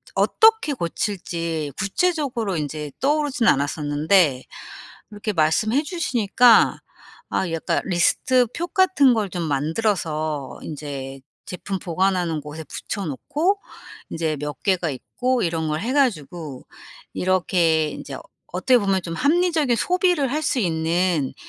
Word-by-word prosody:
어떻게 445 -8 +4
고칠지 170 - -3
구체적으로 245 - -1
인제 150 -1 -4
떠오르진 290 -3 +1
않았었는데 145 +1 +2 0.7
이렇게 210 +1 -4
말씀해 210 - +2
주시니까 245 - +3 0.5
아 175 - -1
약간 165 -1 -1
리스트 225 +8 +2
표 345 +1 -2
같은 360 -9 +4
걸 210 -3 -1
좀 175 -1 -4
만들어서 155 -1 -2
인제 140 -3 -7 0.2
제품 190 +1 -5
보관하는 180 -3 0
곳에 150 +2 -8
붙여 200 +7 -5
놓고 305 - -1 0.5
이제 160 -2 -2
몇 150 -1 -6
개가 180 -4 +1
있고 250 - -2
이런 165 -2 -1
걸 155 0 -1
해 235 - -2
가지고 170 - -1 0.5
이렇게 175 -4 +1
인제 140 -2 -7 0.3
어떻게 220 +8 +3
보면 195 -3 +1
좀 165 -1 -5
합리적인 310 - +2
소비를 355 -3 +1
할 305 +2 -1
수 290 -3 0
있는 165 - 0
185 Hz, 270 characters per minute, -22 LUFS, 155-255 Hz, 0.7 s, 어떻게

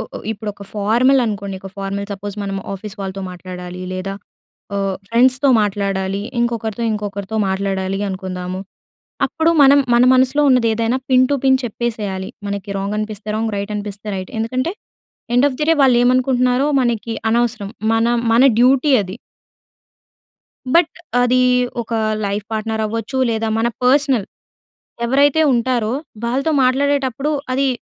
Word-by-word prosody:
ఉ - - -2
ఉ - - -7
ఇప్పుడు 210 0 -5
ఒక 200 - -12
ఫార్మల్ 240 +6 +3
అనుకోండి. 200 -3 -3
ఒక 195 - -8
ఫార్మల్ 200 +1 -3
సపోజ్ 200 0 -6
మనం 195 -1 -3 0.2
ఆఫీస్ 200 +1 -7
వాళ్ళతో 195 0 -5
మాట్లాడాలి 180 0 -8
లేదా 185 +1 -4 0.6
ఆహ్, 195 -1 -1
ఫ్రెండ్స్‌తో 255 +4 +3
మాట్లాడాలి 195 -1 -1 0.2
ఇంకొకరితో, 230 -2 -2
ఇంకొకరితో 205 0 -4
మాట్లాడాలి 190 0 -1
అనుకుందాము. 185 -1 -5 0.7
అప్పుడు 320 +1 +1
మనం 280 +1 +7 0.2
మన 240 +1 +5
మనసులో 260 +3 +3
ఉన్నది 250 -3 +4
ఏదైనా 230 +2 0
పిన్ 255 0 +5
టు 285 - +1
పిన్ 265 -1 +5
చెప్పేసేయాలి. 210 -5 -3 0.2
మనకి 200 0 -4
రాంగ్ 200 +2 -2
అనిపిస్తే 215 0 -5
రాంగ్ 225 0 -1
రైట్ 200 +1 -4
అనిపిస్తే 205 0 -7
రైట్. 185 -1 -7
ఎందుకంటే 255 +8 -1 0.6
ఎండ్ 265 - +5
ఆఫ్ 255 - -6
ది - - +2
డే 325 - +5
వాళ్ళు 260 -3 +5
ఏమనుకుంటున్నారో 255 +1 +2
మనకి 230 -2 -1 0.2
అనవసరం. 230 -3 0 0.2
మన 225 +1 +2 0.3
మన 230 - +5 0.2
డ్యూటీ 265 +4 +4
అది. 190 +1 -7 1.6
బట్ 335 -1 +4 0.3
అది 250 +1 +3 0.4
ఒక 230 - -10 0.3
లైఫ్ 200 +1 -2
పార్ట్నర్ 220 0 -2
అవ్వచ్చు. 230 +5 -3
లేదా 225 0 -1
మన 225 - +1 0.2
పర్స్‌నల్ 260 -5 +3 0.8
ఎవరైతే 285 +5 +3
ఉంటారో 235 -2 0 0.3
వాళ్ళతో 270 +6 0
మాట్లాడేటప్పుడు 275 +1 +1 0.2
అది, 270 +1 +1
225 Hz, 140 wpm, -18 LUFS, 200-255 Hz, 1.6 s, మనం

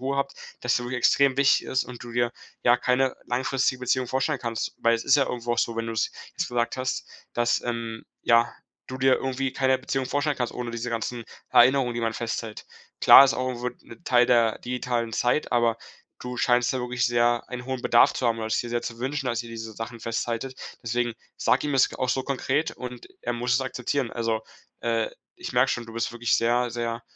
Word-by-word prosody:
Ruhe 135 +2 -2
habt, 140 0 -1 0.3
dass 125 0 +1
du 120 - -2
wirklich 125 +1 -3
extrem 135 +2 +4
wichtig 140 0 +4
ist 130 0 0
und 125 -1 -10
du 120 - -9
dir, 120 0 +1 0.3
ja, 120 0 +5
keine 130 +1 +1
langfristige 130 0 0
Beziehung 125 0 0
vorstellen 135 +3 0
kannst, 115 -2 -3
weil's 115 0 +2
ist 140 - +5
ja 135 - +2
irgendwo 120 -1 -2
auch - - -2
so, 115 -1 0
wenn 115 0 -2
du's 110 -2 -1 0.3
gesagt 120 +1 -1
hast, 130 0 -2 0.3
dass, 120 0 +2
ähm, 115 -2 -4 0.2
ja, 115 0 +4 0.4
du 130 - -6
dir 130 0 +5
irgendwie 135 0 -2
keine 130 -1 +2
Beziehung 130 0 -2
vorstellen 145 +1 0
kannst, 125 -2 -2
ohne 120 -1 -5
diese 115 +1 -4
ganzen 115 +1 -3 0.3
Erinnerungen, 125 -1 +5
die 120 - -2
man 115 -1 0
festhält. 115 -1 -5 0.3
Klar 135 - +10
ist 135 - +2
auch 125 -1 -3
wird 125 0 -4
'ne 175 - -14
Teil 125 -4 +4
der 115 -3 +3
digitalen 120 -2 -2
Zeit. 125 +4 0
Aber 120 -2 +3 0.4
du 125 0 -6
scheinst 120 0 +2
ja 130 - -2
wirklich 125 0 0
sehr 120 0 +1
einen 125 -1 -6
hohen 130 -1 -3
Bedarf 120 - +5
zu 125 - -1
haben 115 -1 +1
oder 110 0 -3
es 110 - +1
dir 120 - -2
sehr 120 0 -1
zu 115 -1 -6
wünschen, 135 +2 -2
dass 120 0 -1
ihr - - -10
diese 115 -1 -7
Sachen 115 +1 -7
festhaltet. 115 +3 -3 0.2
Deswegen 120 0 -1 0.2
sag 125 - +2
ihm 145 -1 -2
es 135 - +4
g - - -11
auch 130 - -1
so 130 +1 0
konkret 140 +3 -1
und 125 -1 -8 0.2
er 120 - -1
muss 120 +1 0
es 130 - +3
akzeptieren. 130 0 -2
Also, 115 -2 -1 0.4
äh, 115 -1 0 0.3
ich - - -6
merke 125 +2 +3
schon, 120 -1 -3
du 115 - -10
bist 115 0 -2
wirklich 120 0 +1
sehr 120 +1 +1
sehr 115 0 -3
120 Hz, 215 wpm, -26 LUFS, 115-130 Hz, 0.4 s, Klar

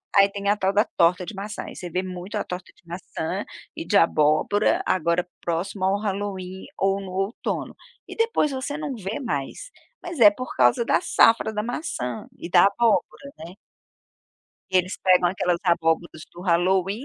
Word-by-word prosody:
Aí 200 0 +6
tem 200 0 -5
a 205 - +4
tal 190 -1 0
da 210 +2 +3
torta 180 +1 +3
de 220 - -7
maçã. 210 +2 -6
Aí, - - -9
você 175 - -7
vê 185 +3 -2
muito 185 +3 -7
a - - -1
torta 180 0 -7
de - - -28
maçã 175 +1 -5 0.3
e 325 - -5
de 205 - +3
abóbora, 155 +5 +3
agora 170 0 +1
próximo 175 +3 -3
ao 195 +1 +1
Halloween 195 -2 -4
ou 195 +1 +1
no 190 - -8
outono. 195 +4 -3 0.3
E - - -9
depois 455 -10 +1
você 270 +2 -4
não 295 -4 -4
vê 210 +5 -5
mais. 235 - -4 0.3
Mas 345 -6 -6
é 210 -3 +9
por 255 +5 -7
causa 125 - +3
da - - +2
safra 225 -1 +4
da 210 0 -3
maçã 175 - -4
e - - -7
da 175 +1 +6
abóbora, 235 +6 0
né? 170 +3 -10 1.1
Eles 185 0 +1
pegam 180 -2 +4
aquelas 180 -2 0
abóboras 165 -2 0
do 175 - -10
halloween 190 +5 +1
190 Hz, 175 wpm, -24 LUFS, 175-215 Hz, 1.1 s, é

